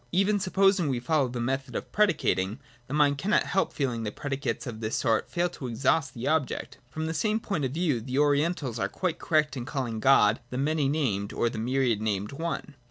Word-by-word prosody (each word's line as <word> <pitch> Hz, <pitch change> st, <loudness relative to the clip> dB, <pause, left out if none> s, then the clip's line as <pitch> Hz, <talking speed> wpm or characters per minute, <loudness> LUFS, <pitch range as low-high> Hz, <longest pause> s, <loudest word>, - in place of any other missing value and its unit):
Even 195 Hz, +3 st, +2 dB
supposing 190 Hz, -2 st, +3 dB
we 130 Hz, -3 st, 0 dB
follow 140 Hz, +2 st, +1 dB
the 125 Hz, 0 st, -5 dB
method 130 Hz, +1 st, -2 dB
of -, -, -4 dB
predicating, 115 Hz, -, +1 dB, 0.3 s
the 135 Hz, -, -6 dB
mind 145 Hz, -2 st, +3 dB
cannot 205 Hz, +6 st, +2 dB
help 190 Hz, +1 st, 0 dB
feeling 125 Hz, -5 st, -2 dB
that 105 Hz, -2 st, -4 dB
predicates 140 Hz, 0 st, -3 dB
of 115 Hz, -4 st, -6 dB
this 110 Hz, 0 st, -2 dB
sort 115 Hz, -3 st, +1 dB
fail 175 Hz, 0 st, +1 dB
to 140 Hz, -6 st, -7 dB
exhaust 130 Hz, +4 st, +1 dB
the 120 Hz, +1 st, -4 dB
object. 155 Hz, -4 st, -1 dB
From 155 Hz, +5 st, -4 dB
the 160 Hz, -, -2 dB
same 215 Hz, +7 st, +1 dB
point 195 Hz, -10 st, -2 dB
of 130 Hz, -, -3 dB
view 155 Hz, -9 st, +1 dB
the 130 Hz, +3 st, -4 dB
Orientals 145 Hz, -3 st, +1 dB
are -, -, 0 dB
quite 175 Hz, -3 st, -2 dB
correct 155 Hz, -2 st, +1 dB
in 125 Hz, -, -4 dB
calling 120 Hz, -4 st, -3 dB
God 110 Hz, -3 st, +5 dB
the 125 Hz, -, -4 dB
many 145 Hz, 0 st, +1 dB
named 110 Hz, -10 st, -1 dB
or 120 Hz, -, 0 dB
the -, -, -5 dB
myriad 120 Hz, -2 st, +1 dB
named 105 Hz, -2 st, -1 dB
One. 160 Hz, 0 st, -4 dB
135 Hz, 210 wpm, -27 LUFS, 120-160 Hz, 0.3 s, God